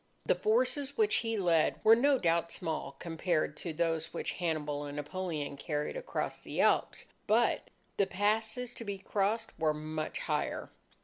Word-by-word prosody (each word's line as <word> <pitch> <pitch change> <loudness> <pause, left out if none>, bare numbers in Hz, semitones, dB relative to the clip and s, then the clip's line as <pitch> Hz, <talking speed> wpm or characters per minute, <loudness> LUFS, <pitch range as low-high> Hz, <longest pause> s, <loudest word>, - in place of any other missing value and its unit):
The - - +4
forces 425 - +1
which 435 -2 +3
he 225 -1 -1
led 170 -5 +3
were 220 +1 +9
no 275 +3 +4
doubt 170 -4 +1
small 160 -5 -3
compared... 165 -2 -1
to 170 - -4
those 165 0 -1
which 170 - -3
Hannibal 150 -4 -2
and 145 0 -6
Napoleon 150 -1 -3
carried 150 0 -2
across - - -3
the - - -5
Alps. - - +2 0.2
But... - - +2 0.3
the 200 - +3
passes 220 +5 0
to - - -7
be 200 -2 -4
crossed 200 +3 -1
were 155 -1 +2
much 155 0 -4
higher." - - -2
175 Hz, 160 wpm, -32 LUFS, 155-225 Hz, 0.3 s, were